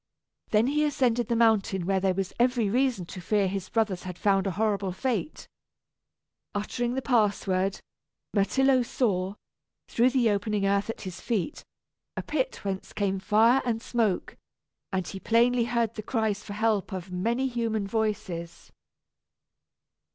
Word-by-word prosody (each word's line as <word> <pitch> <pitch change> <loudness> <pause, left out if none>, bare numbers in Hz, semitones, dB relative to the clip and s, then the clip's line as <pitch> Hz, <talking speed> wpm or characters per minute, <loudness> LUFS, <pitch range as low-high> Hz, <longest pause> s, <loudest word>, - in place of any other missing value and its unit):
Then 215 +1 +3
he 295 +3 +1
ascended 245 -6 +1
the 235 - 0
mountain 215 -5 +2
where 195 +1 +2
there 190 -1 +1
was 195 -1 -2
every 240 -4 +2
reason 250 -6 +1
to 185 +2 -8
fear 200 +2 +1
his 185 -1 -4
brothers 215 -5 0
had 180 -1 -7
found 195 0 +2
a - - 0
horrible 205 -3 0
fate. 250 - -3 1.1
Uttering 240 +4 -2
the 265 - -2
password, 200 -5 +1 0.5
Myrtillo 260 +6 +3
saw, 200 -6 0 0.5
through 240 +2 +3
the 245 -4 +2
opening 205 0 0
earth 200 +2 +1
at 225 - -5
his 185 -1 -7
feet, 230 +3 -2 0.5
a - - -2
pit - - -2
whence 190 -1 -4
came 195 -2 0
fire 220 +6 +4
and 230 -3 -1
smoke; 225 -5 -1 0.6
and 190 -2 -1
he 195 - -6
plainly 235 +3 +3
heard 235 -2 0
the 215 - -5
cries 215 -2 -1
for 205 - -8
help 215 -2 0
of 185 -1 -6
many 230 +9 0
human 230 -4 -1
voices. 195 -6 -3
215 Hz, 150 wpm, -27 LUFS, 195-235 Hz, 1.1 s, fire